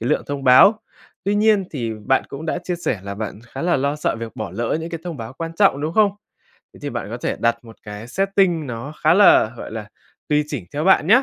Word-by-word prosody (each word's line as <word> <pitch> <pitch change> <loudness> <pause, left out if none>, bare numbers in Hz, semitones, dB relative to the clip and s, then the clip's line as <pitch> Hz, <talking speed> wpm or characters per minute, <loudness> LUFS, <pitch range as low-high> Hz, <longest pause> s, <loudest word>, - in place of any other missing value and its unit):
cái 115 - -2
lượng 150 - +1
thông 140 -1 -4
báo. 165 - +7 0.4
Tuy 200 +2 +1
nhiên 210 -1 +3
thì 120 -7 -3
bạn 135 - +3
cũng 150 +4 -7
đã - - -1
chia 180 - -2
sẻ 165 - -2
là 100 0 -6
bạn 105 0 -5
khá - - -6
là 175 0 +2
lo 140 +2 0
sợ 150 - -1
việc 115 -1 -7
bỏ 110 - -4
lỡ 115 +7 -1
những 165 +1 -6
cái 165 - -5
thông 175 -3 -5
báo 115 -1 -7
quan 165 +4 -6
trọng, 165 -6 +3
đúng 155 +2 -2
không? 210 -2 +4 0.6
Thế - - -15
thì - - -3
bạn - - -5
có - - -4
thể - - -2
đặt 115 0 0
một 115 -1 -13
cái 105 +2 -8
setting 190 -1 +1
nó 125 +3 -6
khá - - +5
là, 180 - +6
gọi - - -8
là, 110 -2 -6 0.4
tùy 150 0 +2
chỉnh 140 -10 -4
theo 150 +2 -1
bạn 190 -4 +4
nhá, 245 +7 +6
145 Hz, 255 wpm, -21 LUFS, 115-180 Hz, 0.6 s, báo